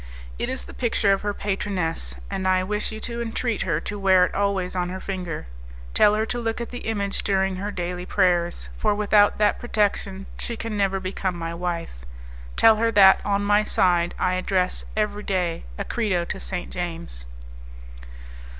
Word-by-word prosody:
It - - -1
is 260 - -2
the - - -11
picture 220 -4 +2
of 195 - -1
her 205 - -1
patroness, 190 - -2 0.2
and 190 - -1
I 185 0 +3
wish 210 +3 -2
you 220 - -6
to 235 0 -4
entreat 230 -1 -2
her 165 -4 0
to 205 0 -5
wear 190 -2 +5
it - - -5
always 195 -2 0
on 180 -1 0
her 185 +1 -5
finger; 180 -5 -4 0.5
tell 210 0 +5
her 215 +1 +1
to 240 +2 -3
look 225 -1 -2
at 235 - -5
the 245 -2 -6
image 200 -2 -2
during 190 -1 +1
her 200 +2 -3
daily 180 -2 -4
prayers, 175 -3 +1
for 210 -1 +2
without 205 0 +4
that 210 -1 +2
protection 200 -4 -1
she 235 - -4
can 225 -1 -4
never 195 -1 +1
become 185 -1 -2
my 165 0 -4
wife. 170 - -3 0.6
Tell 220 -1 +7
her 230 +1 +2
that, 195 -2 +7
on 200 0 +1
my 205 +1 +4
side, 175 -4 +2
I 185 - +1
address 185 0 0
every 210 -1 0
day 180 - -1
a - - -3
credo 190 -7 0
to 190 - -5
St. 180 -2 -4
James." 165 - -4
195 Hz, 185 wpm, -24 LUFS, 180-210 Hz, 0.6 s, Tell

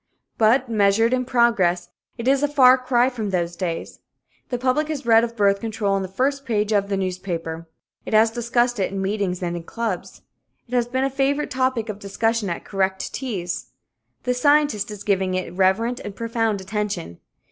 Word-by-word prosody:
But, 240 +4 +4
measured 220 +1 +3
in 255 0 0
progress, 205 -9 +2 0.3
it 235 +1 -4
is 275 +1 +4
a 290 - +3
far 260 -3 +6
cry 255 -1 +2
from 230 -5 -3
those 175 -2 -1
days. 170 -2 -4 0.5
The 245 - -1
public 260 +5 +1
has 300 -5 -4
read 225 -1 +6
of 235 0 -3
birth 200 -2 +3
control 215 -2 -1
on 195 - +1
the 190 - -3
first 270 +8 -1
page 215 -4 0
of 200 -2 +2
its 195 - +1
newspapers. 175 -3 -4 0.4
It - - -2
has 220 +1 +5
discussed 240 0 0
it 190 - 0
in 195 - -3
meetings 190 -2 -1
and 175 0 -2
in 170 - -4
clubs. 210 +1 -5 0.4
It 245 - -12
has 240 -1 +2
been 260 +2 -1
a 270 - +1
favorite 275 +2 0
topic 255 -3 0
of 210 -2 -5
discussion 220 +1 -1
at 170 - -5
correct 190 -1 -1
teas. 180 - -4 0.5
The 250 - +1
scientist 285 -5 +2
is 210 -1 -8
giving 190 -2 +1
it 185 -1 -3
reverent 195 +7 +1
and 205 -1 -7
profound 225 -3 -1
attention. 190 - -4
220 Hz, 190 wpm, -22 LUFS, 190-250 Hz, 0.5 s, far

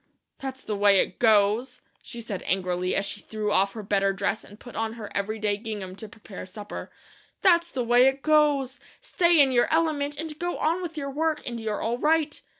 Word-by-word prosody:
"That's 265 -1 -6
the 210 - -3
way 200 -1 +5
it - - -1
goes," 220 +3 +3 0.2
she 235 - -9
said 210 -5 -5
angrily, 180 -1 0
as 195 - +1
she 205 +1 -2
threw 215 -1 -3
off 195 0 +2
her 220 - -7
better 195 -1 +1
dress 195 +2 -2
and 205 +1 -15
put 245 - -12
on 225 0 -2
her 220 -3 -8
every 200 +2 -1
day 210 -1 0
gingham 205 -4 -6
to 220 - -9
prepare 210 -2 -10
supper. 205 +2 -8 0.5
"That's 340 -2 +5
the 255 -6 -2
way 245 +2 +5
it 270 0 0
goes! 295 -4 +2 0.2
Stay 345 -2 +2
in 275 -2 +5
your 240 -1 +2
element, 300 -3 0
and 310 -1 -5
go 350 0 -2
on 335 +4 0
with 330 -3 -6
your 280 -2 -3
work, 310 +2 -1
and 235 -1 -4
you're 220 -2 -3
all 235 +2 -1
right. 310 0 +1
235 Hz, 210 wpm, -26 LUFS, 205-295 Hz, 0.5 s, way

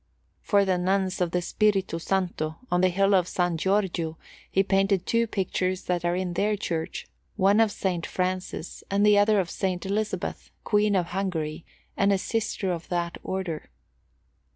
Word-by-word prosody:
For 200 -2 +3
the 185 -2 +1
Nuns 190 0 0
of 175 - +2
the 180 +1 -1
Spirito 195 -3 +1
Santo, 170 -4 -1
on 180 0 +3
the 185 - +4
hill 195 +2 +2
of 180 -2 +4
San 175 -1 0
Giorgio, 175 -3 0 0.3
he 195 - +3
painted 195 -1 +2
two 230 0 +2
pictures 185 -2 -1
that 175 -2 -1
are 175 0 +1
in 180 -1 -2
their 205 +4 +1
church, 165 -5 -3 0.3
one 200 +1 +4
of 225 -1 +5
S. 190 -3 -1
Francis, 185 -2 -3
and 200 +1 +2
the 210 -1 +6
other 205 0 +4
of 180 -3 -1
S. - - -9
Elizabeth, 195 +4 -2
Queen 210 -1 +2
of 180 -2 +2
Hungary 170 -4 -3 0.3
and 195 +1 +3
a 200 - +3
sister 205 -2 -1
of 170 -2 -5
that 175 -1 -2
Order. 185 -5 -4
185 Hz, 170 wpm, -26 LUFS, 175-200 Hz, 0.3 s, the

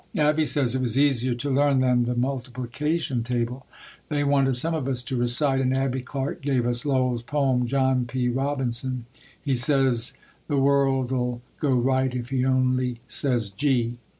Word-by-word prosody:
Abbie 150 +1 +2
says 140 -6 +2
it 130 - -1
was 125 -1 +1
easier 130 -3 +2
to 140 +4 -4
learn 140 0 +3
than 125 -2 +2
the 125 +1 -2
multiplication 130 +3 -2
table. 125 +2 -3 0.4
They 145 -1 0
wanted 135 -2 +2
some 160 +7 +3
of 150 -5 -2
us 125 -2 -2
to 130 +1 -4
recite 125 +3 +2
and 130 0 +1
Abbie 135 -1 -1
Clark 135 +2 -5
gave 135 -4 0
us 120 +4 -1
Lowell's 130 -3 +1
poem, 130 -1 0
"John 130 -1 +1
P. 125 +1 -2
Robinson, 130 -1 -2 0.3
he, 140 -3 -1
says 125 -2 +3 0.3
the 145 - -1
world'll 135 -3 +1 0.2
go 140 -3 +1
right 130 +1 +1
if 125 -1 -5
he 130 -2 0
only 130 -2 +1
says 120 -7 0
Gee!" 120 0 0
130 Hz, 165 wpm, -24 LUFS, 125-140 Hz, 0.4 s, learn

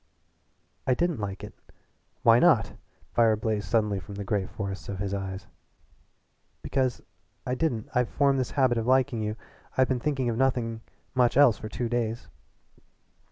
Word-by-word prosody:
"I 130 - +4
didn't 170 -2 0
like 100 -2 -5
it." - - -8 0.7
"Why - - +7
not?" - - +4 0.4
Fire 115 -2 +4
blazed 105 -2 -2
suddenly 105 -2 +1
from 100 +2 -10
the 100 - -4
gray 100 -1 -1
forests 100 -1 -6
of 100 - -4
his 100 +1 -3
eyes. 95 0 -4 1.2
"Because 130 -3 -1 0.4
I 125 - -1
didn't. 125 -6 -1
I've 125 -1 +1
formed 140 -2 +2
the 130 - -2
habit 130 -4 +3
of 115 - -3
liking 130 -2 +2
you. 105 0 -2 0.4
I've 130 -1 +4
been 130 -2 +1
thinking 135 -2 -1
of 115 -1 -1
nothing 120 -3 0 0.3
much 125 -1 +2
else 130 -8 +6
for 110 - -6
two 115 +3 -3
days." 115 -1 -2
115 Hz, 160 wpm, -27 LUFS, 105-130 Hz, 1.2 s, Why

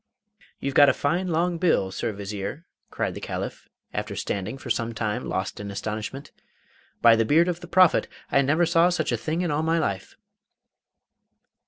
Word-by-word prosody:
'You've 140 - -3
got 145 0 +7
a - - +2
fine 175 +6 0
long 170 0 0
bill, 160 - +2
Sir 110 - -2
Vizier,' 100 - -6 0.2
cried - - -2
the - - -8
Caliph, - - -5 0.2
after - - -3
standing 100 +6 -3
for 130 -2 -6
some 115 0 -1
time 110 +2 -2
lost 95 +1 -3
in 105 0 -6
astonishment. 110 +7 -5 0.7
'By 115 -1 +8
the 115 - +2
beard 160 +9 +4
of 175 -1 -1
the - - -10
Prophet 185 -2 +4 0.2
I 140 - +4
never 155 +6 +2
saw 170 +1 +4
such 170 -6 -1
a - - +2
thing 155 +9 -2
in 175 -3 -1
all 145 +1 0
my 165 +1 +1
life! 100 - -2
140 Hz, 180 wpm, -25 LUFS, 110-165 Hz, 0.7 s, By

